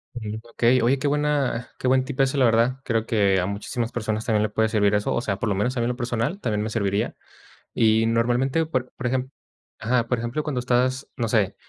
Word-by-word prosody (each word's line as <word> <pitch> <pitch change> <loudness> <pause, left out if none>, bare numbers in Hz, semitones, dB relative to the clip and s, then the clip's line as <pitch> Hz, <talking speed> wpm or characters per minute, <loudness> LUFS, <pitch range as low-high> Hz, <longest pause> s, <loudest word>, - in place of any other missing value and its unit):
Ujú, 110 -2 -5
okey. 120 +2 +3
Oye, 130 +4 +3
qué 145 - -1
buena 145 -4 0
qué 130 - -1
buen 130 0 +3
tipazo, 135 +1 0
la 130 - +4
verdad. 115 +3 +2
Creo 115 -2 0
que 100 -5 +2
a 90 - 0
muchísimas 110 +4 -3
personas 110 -1 -3
también 110 -2 +2
le 110 - 0
puede 110 +1 +1
servir 105 -2 +2
eso, 105 - 0
o - - 0
sea, 100 -5 -2
por 115 - -2
lo 100 - +1
menos 125 +6 -1
a - - +1
mí 115 - +1
en - - 0
lo 125 - -2
personal 120 - -2
también 105 - -1
me 110 - -3
serviría. 105 0 -1 0.6
Y 110 0 +3
normalmente, 125 +7 +1
por 130 -5 -3
por 130 - -3
ejem 130 +1 -1 0.5
ajá, 120 +1 +1
por 125 - 0
ejemplo 120 +6 -2
cuando 140 -5 -2
estás, 125 +2 0
no 120 -3 -1
sé, 105 -3 +1
120 Hz, 230 wpm, -24 LUFS, 110-130 Hz, 0.6 s, la